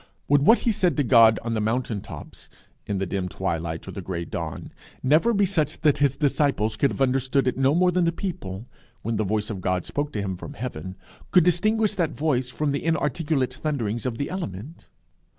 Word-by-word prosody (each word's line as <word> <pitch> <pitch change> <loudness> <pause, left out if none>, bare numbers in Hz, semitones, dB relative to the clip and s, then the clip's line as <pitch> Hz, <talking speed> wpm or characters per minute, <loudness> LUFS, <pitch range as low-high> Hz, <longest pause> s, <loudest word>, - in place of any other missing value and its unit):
Would 145 0 +4
what 225 +11 +6
he 235 - +2
said 180 -5 +1
to 145 - +3
God 115 -3 +6
on 115 0 -2
the 110 - 0
mountain 110 -1 -1
tops, - - -10 0.4
in 100 - -1
the 95 - -1
dim 95 0 -3
twilight 85 -3 -3
or - - -5
the 95 - -6
gray 85 -2 -4
dawn, 80 -2 -5 0.3
never 155 - +4
be 205 -3 +3
such 155 -6 -1
that 150 -3 +3
his 140 -2 +2
disciples 140 -7 +1
could 140 +5 +2
have 135 - 0
understood 130 +1 +1
it 125 - +1
no 135 +3 +2
more 180 +1 +4
than 180 -1 +2
the 165 - +2
people, 120 - -5 0.4
when 115 0 -1
the 110 - +1
voice 105 +2 -1
of 95 -3 -5
God 90 0 -1
spoke 145 0 -3
to 105 - -2
him 95 -2 -3
from - - -9
heaven, 95 -6 -6 0.3
could 180 - +5
distinguish 215 +5 +2
that 170 -4 0
voice 130 -5 0
from 150 +2 -1
the 140 - -2
inarticulate 150 -4 0
thunderings 125 -5 -2
of 115 -2 -3
the 140 - -3
element? 150 - -6
130 Hz, 210 wpm, -25 LUFS, 105-155 Hz, 0.4 s, what